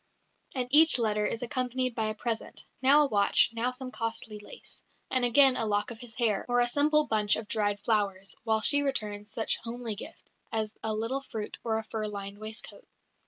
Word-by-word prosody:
And 250 -1 -1
each 310 0 +8
letter 210 -3 +1
is 230 - -3
accompanied 255 0 -1
by 220 -1 -1
a 215 - -3
present 225 0 -4 0.2
now 280 +3 +6
a - - +1
watch, 205 -3 +4
now 230 +2 -1
some 255 0 -8
costly 225 -2 -3
lace, 205 - -7 0.3
and 255 -1 +1
again 260 +2 +6
a - - 0
lock 205 +2 -1
of 225 - -9
his 230 -2 -9
hair, 225 -5 +1
or 245 0 +2
a 245 - +4
simple 300 +4 +2
bunch 210 -4 +2
of 220 - -6
dried 205 -2 0
flowers, 200 -3 -1
while 220 -1 +1
she 285 +5 +3
returns 210 -7 -3
some 225 - -3
such - - +2
homely 235 -1 -5
gift 205 - -11 0.2
as 215 -1 -2
a 220 -1 -1
little 230 +5 -2
fruit 220 -6 -7
or 225 -2 0
a 220 - -3
fur 215 -1 -4
lined 200 -1 -7
waistcoat. 220 - -6
225 Hz, 205 wpm, -29 LUFS, 215-255 Hz, 0.3 s, each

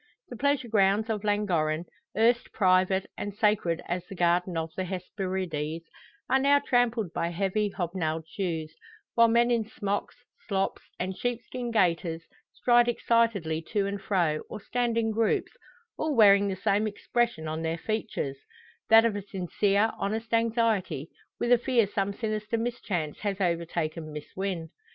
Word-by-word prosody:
The 245 - -7
pleasure 280 0 +1
grounds 210 +1 +2
of 210 -1 -3
Llangorren, 175 -6 0 0.3
erst 235 +2 +3
private 185 -1 +3
and 205 -1 -4
sacred 205 -6 +1
as 175 0 -2
the 195 - -8
Garden 175 0 +1
of 160 0 -3
the 185 - -2
Hesperides, 180 -4 -3 0.4
are 265 - +3
now 280 +1 +5
trampled 240 - +1
by 170 - -1
heavy, 195 +4 0
hobnailed 165 -4 -3
shoes; 160 -4 -3 0.4
while 230 0 +6
men 235 +1 +3
in 235 -2 +2
smocks, 205 -2 -3 0.3
slops, 195 -1 -1 0.2
and 185 +1 -2
sheepskin 245 +1 -3
gaiters, 170 -6 +1 0.3
stride 240 -1 +4
excitedly 225 -9 +1
to 205 -2 +2
and 200 0 -3
fro, 175 -7 +1
or 215 - -6
stand 235 +2 -1
in 225 -1 +1
groups, 225 0 +1 0.5
all 310 -2 0
wearing 200 -3 +6
the 195 - -1
same 205 +3 +1
expression 225 -4 -1
on 155 +1 -3
their 165 0 -1
features 215 -9 -3 0.5
that 225 +1 +8
of 225 -3 +1
a 205 - -3
sincere, 200 +2 +1
honest 220 +3 -3
anxiety, 225 - +1 0.3
with 240 - 0
a 245 - +6
fear 240 -2 +2
some 200 0 -1
sinister 215 +1 -2
mischance 210 -9 -3
has 200 -2 -2
overtaken 170 -3 -2
Miss 150 0 -9
Wynn. 185 -4 -3
200 Hz, 150 wpm, -28 LUFS, 175-225 Hz, 0.5 s, that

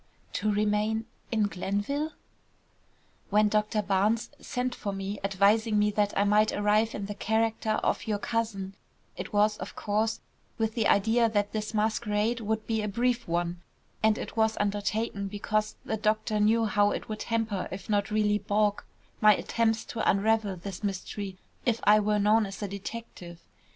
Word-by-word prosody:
"To 215 - 0
remain 210 +1 +1 0.3
in 220 -2 +2
Glenville?" 205 - -2 1.2
"When 210 +1 +4
Doctor 210 0 +1
Barnes 205 +4 +1
sent 250 -1 -2
for 205 - -4
me, 195 +1 -4
advising 205 +3 +3
me 210 0 +3
that 205 0 +1
I 200 - +4
might 210 +1 +4
arrive 210 +2 +2
in 200 - -4
the 205 - -4
character 220 +1 0
of - - 0
your 210 -1 +1
cousin, 205 -3 -2 0.4
it - - -6
was, 210 0 +3
of - - -7
course, 215 +2 0 0.4
with 220 -1 0
the 225 -2 +1
idea 225 +3 +3
that 205 -2 0
this 215 0 -3
masquerade 215 +1 0
would 220 0 -2
be 220 -1 0
a 210 - -2
brief 240 +4 0
one, 175 +1 -1 0.4
and 220 0 +3
it - - -6
was 220 -1 +2
undertaken 205 0 -1
because 210 +1 -1
the 220 - -1
doctor 215 0 0
knew 225 +2 +3
how 205 -1 +3
it - - -4
would 215 -1 -5
hamper 225 -4 -1
if 190 +1 -7
not 205 -2 +1
really 210 -1 +2
balk, 205 0 0 0.3
my 210 -1 +7
attempts 225 +1 0
to 230 - -1
unravel 210 0 +2
this 185 +2 -8
mystery 195 0 -4 0.3
if 235 -2 +1
I 210 +1 +6
were 210 0 +1
known 210 +1 +3
as 195 +1 -7
a - - -1
detective. 195 -3 -8
210 Hz, 165 wpm, -28 LUFS, 205-220 Hz, 1.2 s, my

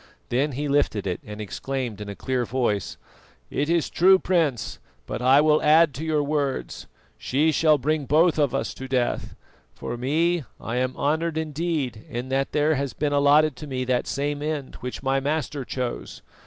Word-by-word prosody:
Then 135 +4 +1
he 145 +4 -2
lifted 140 -8 +1
it, 90 -2 -2
and 105 0 -9
exclaimed 120 +1 -4
in 105 - -6
a 100 - -6
clear 130 +2 -1
voice: 115 -5 -1 0.5
"It 145 +2 -1
is 170 -2 +2
true, 190 +2 +5
Prince, 165 - 0 0.3
but - - -5
I 130 +3 +6
will 155 0 +4
add 155 0 +5
to 150 - -6
your 155 -2 +1
words. 145 -2 -2 0.3
She 150 +5 +2
shall 155 0 +4
bring 145 +1 -1
both 160 +2 +4
of 140 -3 +2
us 135 - -2
to 130 - -8
death. 125 -2 -1 0.4
For 120 - -5
me, 160 +6 +1 0.2
I 115 +2 -4
am 130 0 -1
honoured 160 +2 0
indeed 155 -7 -2
in 120 +2 -5
that 135 +1 0
there 150 +1 +2
has 140 -4 -2
been 145 +2 -1
allotted 145 +1 +4
to 150 - -8
me 130 -2 -3
that 125 -1 0
same 145 +1 -2
end 150 -3 -3
which 125 +2 -6
my 135 0 +2
Master 145 0 -2
chose. 125 - -5
140 Hz, 180 wpm, -24 LUFS, 130-155 Hz, 0.5 s, I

